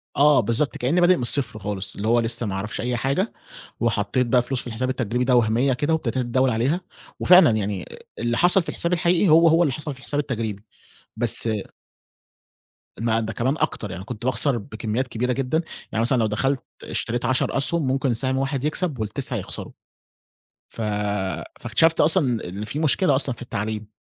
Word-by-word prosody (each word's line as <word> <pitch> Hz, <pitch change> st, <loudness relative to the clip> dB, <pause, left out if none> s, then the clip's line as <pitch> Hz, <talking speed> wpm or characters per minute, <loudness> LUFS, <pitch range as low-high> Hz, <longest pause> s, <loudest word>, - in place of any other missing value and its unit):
آه، 145 Hz, 0 st, +5 dB
بالضبط 115 Hz, +5 st, 0 dB
كأنّي 150 Hz, +9 st, +1 dB
بادئ 180 Hz, +1 st, +5 dB
من -, -, -5 dB
الصفر 120 Hz, -2 st, +3 dB
خالص، 100 Hz, -1 st, -4 dB
اللي 105 Hz, -, -3 dB
هو 120 Hz, +1 st, +4 dB
لسّه 115 Hz, +1 st, 0 dB
ما 100 Hz, -, -3 dB
أعرفش 100 Hz, +2 st, -4 dB
أي 125 Hz, +1 st, -1 dB
حاجة 140 Hz, -, -1 dB, 0.5 s
وحطّيت 115 Hz, +2 st, 0 dB
بقى 125 Hz, +1 st, +4 dB
فلوس 125 Hz, +1 st, -2 dB
في -, -, -8 dB
الحساب 120 Hz, +2 st, -3 dB
التجريبي 125 Hz, -1 st, -1 dB
ده 125 Hz, 0 st, +3 dB
وهمية 120 Hz, +3 st, +2 dB
كده 145 Hz, +6 st, 0 dB
وابتديت 130 Hz, -7 st, -1 dB
أتداول 130 Hz, +1 st, +1 dB
عليها، 130 Hz, +10 st, 0 dB, 0.4 s
وفعلًا 180 Hz, -3 st, +7 dB
يعني 105 Hz, -4 st, -2 dB, 0.3 s
اللي 120 Hz, +1 st, -1 dB
حصل 180 Hz, +1 st, +4 dB
في -, -, -7 dB
الحساب 170 Hz, +1 st, -2 dB
الحقيقي 175 Hz, +2 st, +2 dB
هو، 165 Hz, +2 st, +6 dB
هو 165 Hz, +2 st, +5 dB
اللي 145 Hz, -5 st, 0 dB
حصل 150 Hz, 0 st, -5 dB
في 130 Hz, -, -15 dB
الحساب 145 Hz, +2 st, -3 dB
التجريبي، 115 Hz, -8 st, -3 dB, 0.5 s
بس 120 Hz, 0 st, +1 dB, 1.5 s
ما 115 Hz, 0 st, +1 dB
ده 110 Hz, 0 st, -4 dB
كمان 130 Hz, +5 st, 0 dB
أكتر 105 Hz, -9 st, -2 dB
يعني، 95 Hz, 0 st, -7 dB
كنت 120 Hz, +2 st, -7 dB
باخسر 130 Hz, +1 st, +1 dB
بكميات 110 Hz, +3 st, -3 dB
كبيرة 125 Hz, +1 st, -1 dB
جدًا، 135 Hz, +5 st, 0 dB, 0.3 s
يعني 110 Hz, -, 0 dB
مثلًا 125 Hz, +3 st, +2 dB
لو 115 Hz, -, +2 dB
دخلت 135 Hz, +6 st, -1 dB, 0.2 s
اشتريت 120 Hz, +1 st, -3 dB
10 130 Hz, +2 st, +1 dB
أسهم 145 Hz, +2 st, +1 dB
ممكن 135 Hz, -1 st, +1 dB
سهم 130 Hz, +3 st, -1 dB
واحد 135 Hz, 0 st, -2 dB
يكسب 155 Hz, -2 st, -2 dB
وال9 110 Hz, +5 st, -2 dB
يخسروا -, -, -6 dB, 1.0 s
ف 115 Hz, -, -8 dB, 0.8 s
فاكتشفت 165 Hz, 0 st, +2 dB
أصلًا 145 Hz, -, +2 dB
إن 100 Hz, +4 st, -6 dB
في 145 Hz, -, -4 dB
مشكلة 155 Hz, 0 st, +3 dB
أصلًا 130 Hz, -2 st, 0 dB
في -, -, -11 dB
التعليم، 110 Hz, -2 st, -4 dB
125 Hz, 180 wpm, -23 LUFS, 115-145 Hz, 1.5 s, وفعلًا